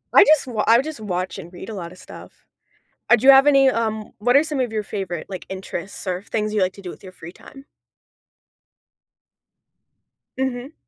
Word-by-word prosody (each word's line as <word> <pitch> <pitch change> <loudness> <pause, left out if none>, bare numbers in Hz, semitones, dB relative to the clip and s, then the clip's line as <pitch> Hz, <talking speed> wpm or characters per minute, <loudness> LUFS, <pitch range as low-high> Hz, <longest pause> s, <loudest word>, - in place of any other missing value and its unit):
I - - +10
just 310 -7 +4
wa 220 -4 -2
I 230 +1 +6
just 310 -4 -7
watch 185 -2 -4
and 175 -2 -10
read 185 +3 -10
a - - -6
lot 170 -4 -7
of 185 - -14
stuff. - - -14 0.6
Uh, 240 - +7
do 240 +3 -2
you 275 - +10
have 270 +1 +6
any, 275 -2 +5
um, 220 -2 -3
what 245 +5 +3
are 285 - +6
some 305 -3 -4
of 245 -3 -1
your 215 -1 -1
favorite, 185 -5 -5
like, 185 -2 -7
interests 190 0 -7
or 180 +1 -2
things 215 0 -3
you 215 - 0
like 185 0 +1
to 200 - -14
do 180 - -6
with - - -13
your 185 - -10
free 170 -1 -11
time? 275 +6 -15 2.7
Mhm. 265 +2 -3
215 Hz, 205 wpm, -21 LUFS, 185-265 Hz, 2.7 s, I